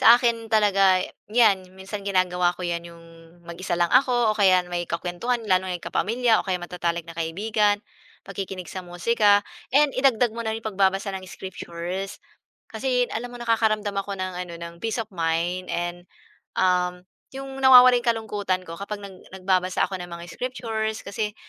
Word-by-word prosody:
Sa - - +3
akin 235 -2 +1
talaga 195 -3 +4 0.3
'yan 195 -6 +3
minsan 195 +1 -7
ginagawa 180 -2 +2
ko 180 - -9
'yan, 170 -1 -2
yung 170 0 -13 0.4
mag-isa 175 +1 -4
lang 175 0 +2
ako 245 -3 +4
o - - -9
kaya 185 -3 +5
may 175 0 -2
kakuwentuhan 180 +8 -2
lalo 185 0 +3
na 185 - -2
yung 175 - -6
kapamilya 230 +1 +2
o - - -2
kaya 185 -2 -1
matatalik 175 -1 -2
na 165 - -9
kaibigan, 205 +5 +1 0.4
pakikinig 190 -2 -6
sa 185 -1 -6
musika 205 +4 +3 0.3
and 295 0 +5
idagdag 250 -3 +3
mo 230 +1 -6
na 220 - -1
yung 225 - -6
pagbabasa 195 -1 +1
ng 190 - -8
scriptures. 185 +1 -6 0.5
Kasi 250 +2 0
alam 245 +2 -4
mo, 245 - -9
nakakaramdam 220 -3 +1
ako 200 0 -2
ng 185 -1 -4
ano, 170 -1 -9
ng 170 0 -7
peace 225 +4 -2
of 220 - -5
mind 175 +1 -1
and 175 0 -3 0.5
um, 180 -1 +1 0.3
yung 270 0 -7
nawawala 255 -1 +9
yung 240 - -9
kalungkutan 205 -5 -1
ko 165 - -8
kapag 205 0 -6
nag 190 -2 -12 0.2
nagbabasa 185 -1 +1
ako 190 -1 -6
ng 175 - -8
mga 170 0 -8
scriptures 220 -3 -3
kasi 210 +1 -3
195 Hz, 175 wpm, -24 LUFS, 180-225 Hz, 0.5 s, nawawala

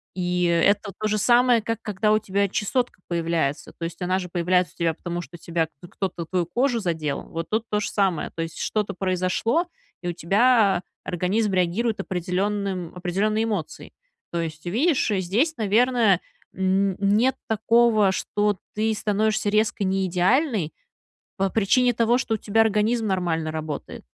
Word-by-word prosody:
И 180 -1 0
это 200 +4 +2
то 215 - -1
же 215 0 0
самое, 240 +1 +4
как 230 0 -3
когда 210 0 +1
у 215 - +3
тебя 200 -1 0
чесотка 240 +1 -2
появляется. 165 -4 -1
То - - -7
есть, 170 - -7
она 185 +1 +1
же 180 -1 -6
появляется 180 0 +1
у - - -32
тебя, 165 -1 +1
потому 175 +1 -5
что 165 +1 -12
у - - -12
тебя 165 0 -1 0.2
кто-то 185 -3 -4
твою 180 0 0
кожу 240 +7 0
задел, 160 -7 -2
вот 165 0 -6
тут 220 +1 0
то 210 - +1
же 200 - -2
самое, 190 -6 0
то 165 - -3
есть 165 -1 -7
что-то 210 -2 -1
произошло, 185 - 0 0.4
и 175 - -5
у - - -2
тебя 200 +3 +3 0.2
организм 195 +4 0
реагирует 195 +5 0
определенным 190 0 -2
определенной 195 +5 0
эмоцией. 205 -8 -4 0.4
То 170 - -1
есть, 155 -1 -6
видишь, 255 - +1
здесь, 205 - +1
наверное, 220 -2 +3 0.3
н 190 +1 +1
нет 210 +6 +3
такого, 220 -2 +3
что 205 +1 0 0.2
ты 220 +1 +1
становишься 215 0 0
резко 215 0 +1
неидеальной 190 - +1 0.6
по 195 0 +1
причине 245 +5 +3
того, 235 +1 +2
что 235 -3 -1
у - - -3
тебя 220 +2 +1
организм 220 +1 +1
нормально 170 -5 -1
работает. 155 -2 -6
195 Hz, 160 wpm, -24 LUFS, 175-220 Hz, 0.6 s, самое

